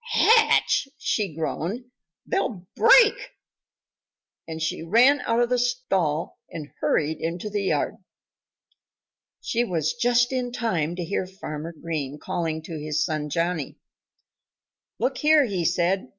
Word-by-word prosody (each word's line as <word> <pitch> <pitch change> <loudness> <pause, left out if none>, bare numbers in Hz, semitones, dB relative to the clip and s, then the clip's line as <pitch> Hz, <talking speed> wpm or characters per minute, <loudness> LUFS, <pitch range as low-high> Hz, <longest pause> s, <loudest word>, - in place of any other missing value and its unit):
"Hatch!" 450 -10 +4
she 200 -8 -2
groaned. 170 +8 -3 0.4
"They'll 220 - -2
break!" 470 -3 +7 1.3
And 160 -1 -6
she 160 0 -2
ran 240 - +4
out 230 0 +2
of 240 - +1
the 250 0 +1
stall 195 -11 -1
and 150 -3 -8
hurried 155 +1 0
into 170 +6 -4
the 205 0 -1
yard. - - 0 1.4
She 235 +1 0
was 165 -9 -1
just 245 +1 +2
in 250 -1 -2
time 175 -10 -1
to 175 -1 -4
hear 185 +1 -2
Farmer 165 -4 -7
Green 150 -4 -4
calling 160 0 -3
to 160 -1 -7
his 150 0 -1
son 155 -2 -3
Johnnie. 165 -2 -2 1.2
"Look 255 +4 -1
here!" 300 -2 +4 0.2
said 180 +4 +2
he. - - -15
180 Hz, 130 wpm, -24 LUFS, 160-245 Hz, 1.4 s, break